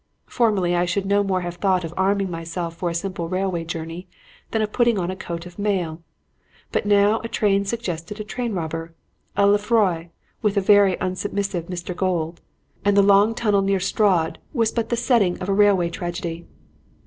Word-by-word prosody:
Formerly 200 -7 +1
I 175 0 +2
should 190 +3 -1
no 200 +1 +3
more 190 -2 0
have 175 0 -5
thought 185 -1 +1
of 165 0 -6
arming 195 0 +1
myself 165 0 -4
for 175 +1 -2
a 170 - -4
simple 170 -2 -3
railway 185 -2 -1
journey 165 +2 -6 0.4
than 220 -1 0
of 210 - -3
putting 235 -2 +2
on 180 -1 -1
a - - -5
coat 170 -2 -6
of 180 +3 -12
mail; 180 -6 -1 0.7
but - - -1
now 205 +2 +4
a 230 - -5
train 200 -3 +1
suggested 200 -3 -4
a - - -3
train 235 +1 -4
robber 165 -1 -4 0.4
a 200 - +5
Lefroy, 205 -5 +2 0.3
with 210 -2 +1
a - - +6
very 200 -1 +5
unsubmissive 185 -1 -2
Mr. 180 0 -5
Gold 170 -3 -1 0.4
and 205 0 +3
the 200 - +7
long 200 +3 +5
tunnel 210 -4 +2
near 195 0 +1
Strood 185 -3 +1
was 230 -5 +1
but 230 -2 -2
the 235 - 0
setting 230 -7 +2
of 185 - -4
a - - +3
railway 195 -4 +3
tragedy. 170 -1 -5
190 Hz, 185 wpm, -22 LUFS, 175-205 Hz, 0.7 s, the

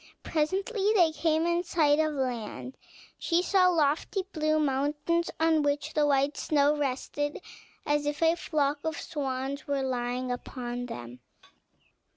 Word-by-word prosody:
Presently 385 +7 0
they 345 -5 +5
came 320 0 +1
in 345 +1 +1
sight 310 -4 +2
of 310 -1 +1
land; 255 -1 -4 0.4
she 340 +1 +1
saw 370 -1 +4
lofty 320 +3 +1
blue 310 -1 +1
mountains, 295 +4 0
on 320 -1 +3
which 290 +1 -1
the 300 -1 +3
white 280 +1 +2
snow 290 -1 +2
rested 290 +1 -2 0.5
as 295 -1 +1
if 295 +2 -1
a 325 +1 +4
flock 295 -4 0
of 320 -2 -2
swans 275 -1 -4
were 280 -1 0
lying 250 0 -2
upon 245 0 -5
them. 120 - -8
295 Hz, 140 wpm, -28 LUFS, 270-325 Hz, 0.5 s, they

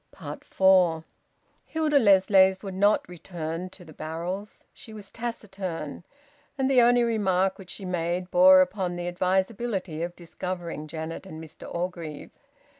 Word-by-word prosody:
FOUR. 180 -4 +4 0.6
Hilda 310 -3 +1
Lessways 190 -3 +5
would 195 -2 -5
not 205 +3 +2
return 175 0 -6
to 180 -1 -14
the 155 - -13
barrels. 175 +7 -6
She 220 - -13
was 205 -2 -10
taciturn, 195 -10 -5 0.5
and 265 0 +1
the 255 -2 +6
only 240 0 +5
remark 195 -5 +1
which 185 -2 -12
she 195 +1 -7
made 180 0 -2
bore 185 +1 +8
upon 185 -1 -1
the 175 0 -4
advisability 190 0 -1
of 175 +1 -4
discovering 170 -2 -6
Janet 160 +4 -6
and 160 -4 -9
Mr 160 -2 -11
Orgreave. 170 -4 -5
185 Hz, 135 wpm, -26 LUFS, 170-200 Hz, 0.6 s, bore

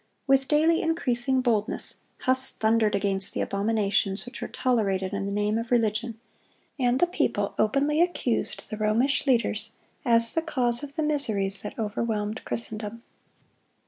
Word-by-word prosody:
With 270 -1 +2
daily 320 +2 +3
increasing 265 -5 0
boldness, 225 -4 -1 0.2
Huss 260 0 +5
thundered 220 -1 +1
against 195 -1 +1
the - - -1
abominations 200 -1 0
which 245 - -10
were - - -3
tolerated 195 -7 -1
in 200 0 -3
the - - -3
name 210 +2 0
of 230 0 -6
religion; 225 -1 0 0.6
and 250 0 +1
the - - +5
people 205 - -1
openly 280 +8 +2
accused 345 -9 -1
the 215 - -4
Romish 230 +8 +1
leaders 225 -3 +1 0.3
as 230 -1 +4
the 325 - +1
cause 250 -7 +1
of 285 -1 -9
the 315 - -1
miseries 215 -10 +1
that 210 - -7
overwhelmed 215 0 -3
Christendom. 225 0 -4
230 Hz, 145 wpm, -26 LUFS, 210-265 Hz, 0.6 s, Huss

